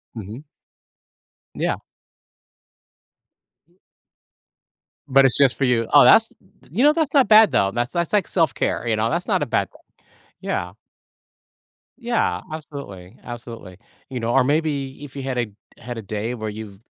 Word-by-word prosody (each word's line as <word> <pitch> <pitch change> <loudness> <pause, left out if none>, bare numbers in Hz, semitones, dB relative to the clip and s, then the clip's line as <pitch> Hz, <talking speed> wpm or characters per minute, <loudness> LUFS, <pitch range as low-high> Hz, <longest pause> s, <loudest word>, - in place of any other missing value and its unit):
Mhm. 110 +5 -8 1.1
Yeah. - - -1 1.9
M 175 - -33 1.3
But 135 0 +5
it's 130 - +5
just 135 -3 +4
for 135 - +1
you. 115 -3 +1
Oh, 145 - +8
that's 225 +1 +6 0.4
you 220 - 0
know, 295 +1 +6
that's 310 -4 -1
not 275 -5 +4
bad 215 0 +7
though, 95 0 +2
that's 120 +3 -2
that's 170 -2 -1
like 205 -2 +2
self-care, 165 -7 0
you 110 - +1
know, 110 +1 0
that's 170 +2 -2
not - - +1
a - - -1
bad - - -1
thing. - - -20 0.6
Yeah. - - -3 1.3
Yeah, 240 -2 -1
absolutely, 140 - -9
absolutely. 115 -6 -9 0.3
You 130 -2 -5
know, 115 +1 -2
or 135 - +4
maybe 145 -1 -1
if 145 -2 -11
you 140 - -5
had 130 -1 -3
a 120 - +1 0.4
had 120 0 -7
a - - -5
day 110 +3 -4
where 110 -3 -5
you've 105 -2 -9
130 Hz, 155 wpm, -21 LUFS, 115-160 Hz, 1.9 s, Oh